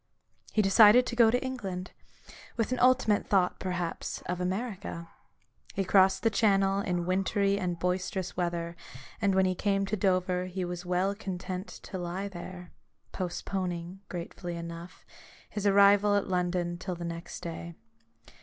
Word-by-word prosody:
He 215 Hz, -, +2 dB
decided 210 Hz, +5 st, +7 dB
to 240 Hz, -, -4 dB
go 235 Hz, -2 st, +6 dB
to 245 Hz, +2 st, +2 dB
England; 195 Hz, -9 st, -4 dB, 0.7 s
with 230 Hz, +1 st, 0 dB
an 255 Hz, -, 0 dB
ultimate 250 Hz, -5 st, +3 dB
thought, 185 Hz, -3 st, +2 dB
perhaps, 180 Hz, -2 st, -3 dB
of 180 Hz, 0 st, -3 dB
America. 190 Hz, -3 st, -4 dB, 0.7 s
He 195 Hz, -, +1 dB
crossed 190 Hz, 0 st, +4 dB
the 225 Hz, -, +3 dB
channel 195 Hz, -2 st, +3 dB
in 175 Hz, -3 st, -1 dB
wintry 195 Hz, +2 st, +1 dB
and 180 Hz, -2 st, -2 dB
boisterous 180 Hz, +2 st, -2 dB
weather, 170 Hz, -1 st, -2 dB, 0.5 s
and 200 Hz, -2 st, +2 dB
when 190 Hz, 0 st, +4 dB
he 185 Hz, -, +2 dB
came 195 Hz, +1 st, 0 dB
to 195 Hz, -, -1 dB
Dover 185 Hz, -2 st, +1 dB
he 185 Hz, 0 st, -3 dB
was 175 Hz, 0 st, -6 dB
well 180 Hz, +2 st, +1 dB
content 185 Hz, -1 st, -5 dB, 0.2 s
to 190 Hz, -, -6 dB
lie 180 Hz, +3 st, -3 dB
there: 180 Hz, -1 st, -9 dB, 0.4 s
postponing, 180 Hz, -1 st, -4 dB
gratefully 175 Hz, 0 st, -5 dB
enough, 170 Hz, +1 st, -8 dB, 0.4 s
his 205 Hz, -1 st, -2 dB
arrival 200 Hz, +1 st, +6 dB
at 200 Hz, -, +1 dB
London 180 Hz, -1 st, -1 dB
till 185 Hz, -1 st, -4 dB
the 170 Hz, 0 st, -6 dB
next 170 Hz, 0 st, -6 dB
day. 170 Hz, 0 st, -6 dB
185 Hz, 150 wpm, -29 LUFS, 175-200 Hz, 0.7 s, decided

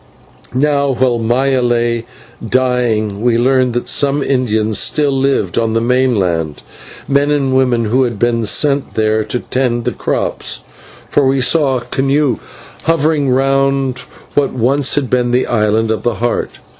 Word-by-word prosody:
Now 140 Hz, 0 st, +1 dB
while 125 Hz, -1 st, +1 dB
Maya 130 Hz, +3 st, +1 dB
lay 120 Hz, -1 st, 0 dB, 0.4 s
dying 115 Hz, -4 st, 0 dB
we 120 Hz, -1 st, +2 dB
learned 130 Hz, 0 st, +2 dB
that 120 Hz, -, -3 dB
some 140 Hz, 0 st, +1 dB
Indians 110 Hz, -6 st, 0 dB
still 145 Hz, -2 st, +1 dB
lived 135 Hz, -8 st, 0 dB
on 115 Hz, -1 st, 0 dB
the 115 Hz, -, +2 dB
mainland, 105 Hz, -, 0 dB, 0.4 s
men 140 Hz, +1 st, +2 dB
and 140 Hz, -3 st, +1 dB
women 125 Hz, -3 st, +2 dB
who 120 Hz, +5 st, +1 dB
had 120 Hz, -4 st, -1 dB
been 115 Hz, +1 st, 0 dB
sent 140 Hz, +2 st, +1 dB
there 110 Hz, 0 st, +1 dB
to 125 Hz, -, -3 dB
tend 120 Hz, -3 st, -1 dB
the -, -, 0 dB
crops, 60 Hz, -1 st, -3 dB, 0.5 s
for 140 Hz, -2 st, +2 dB
we 135 Hz, 0 st, +1 dB
saw 135 Hz, +1 st, +2 dB
a -, -, -5 dB
canoe 135 Hz, +3 st, 0 dB, 0.5 s
hovering 155 Hz, -3 st, +1 dB
round 135 Hz, 0 st, +1 dB, 0.3 s
what 145 Hz, -1 st, +1 dB
once 130 Hz, +3 st, +1 dB
had 145 Hz, -3 st, 0 dB
been 125 Hz, 0 st, 0 dB
the 125 Hz, +1 st, +1 dB
Island 110 Hz, 0 st, +1 dB
of 110 Hz, -, -2 dB
the 120 Hz, -2 st, -1 dB
Heart. 120 Hz, +1 st, -2 dB
125 Hz, 155 wpm, -15 LUFS, 115-135 Hz, 0.5 s, we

